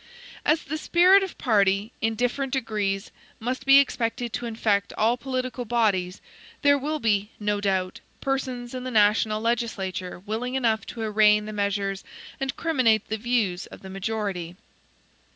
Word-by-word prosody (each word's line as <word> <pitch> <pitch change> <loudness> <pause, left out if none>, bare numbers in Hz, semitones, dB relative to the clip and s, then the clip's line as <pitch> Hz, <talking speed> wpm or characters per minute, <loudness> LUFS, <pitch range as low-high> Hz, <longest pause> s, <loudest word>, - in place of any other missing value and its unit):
As 310 +1 +2
the 310 +2 -4
spirit 365 +5 +5
of 385 -2 -5
party, 200 -2 +2
in 225 0 0
different 250 +3 -1
degrees, 210 -6 -2 0.3
must 255 +3 -4
be 275 0 +9
expected 240 -3 0
to 240 - -3
infect 215 -3 0
all 225 +3 +2
political 255 0 -3
bodies, 210 -6 0 0.4
there 285 0 +6
will 295 +3 -2
be, 210 -6 +1
no 205 -1 -1
doubt, 190 -2 -1 0.2
persons 260 -3 -3
in 255 -1 -5
the 255 - -4
national 215 -1 +3
legislature 200 -6 -2
willing 220 +7 -4
enough 225 -4 +1
to 230 - -7
arraign 210 -1 +4
the 215 - -6
measures 200 -1 -1 0.4
and 270 0 -2
criminate 255 -10 +2
the 220 - -1
views 215 -6 -1
of - - -13
the 190 - -8
majority. 195 -3 -3
225 Hz, 150 wpm, -25 LUFS, 205-255 Hz, 0.4 s, be